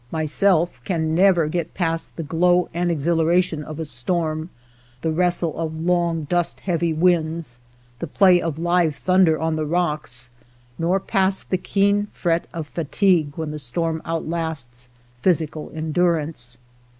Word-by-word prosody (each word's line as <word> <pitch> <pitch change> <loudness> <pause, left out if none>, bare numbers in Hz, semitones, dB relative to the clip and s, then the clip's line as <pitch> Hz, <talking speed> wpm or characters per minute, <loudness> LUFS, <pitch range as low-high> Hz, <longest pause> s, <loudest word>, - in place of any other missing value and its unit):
Myself 160 -1 +1
can 160 0 -1
never 175 -2 +4
get 170 +2 -3
past 165 -2 -1
the 165 - -4
glow 175 +3 +2
and 175 +1 0
exhilaration 165 +1 +1
of 155 +1 -8
a 160 - -3
storm, 155 +4 -1 0.5
the 160 - 0
wrestle 175 0 0
of 160 -1 -3
long 170 -1 +1
dust 175 +3 -1
heavy 170 -2 0
winds, 160 -5 0 0.4
the 170 - -4
play 180 +2 +4
of 165 -3 -3
live 170 -2 +1
thunder 185 -3 +3
on 160 0 -1
the 155 - -1
rocks, 150 -8 -2 0.5
nor 175 +4 +2
past 190 0 0
the 185 - +3
keen 200 +2 +1
fret 170 -1 0
of 165 -2 -5
fatigue 165 0 +1
when 160 -2 -4
the 150 - -5
storm 160 +5 -2
outlasts 160 -7 -4 0.3
/^physical 160 -4 0
endurance. 155 -6 -1
165 Hz, 140 wpm, -22 LUFS, 155-175 Hz, 0.5 s, never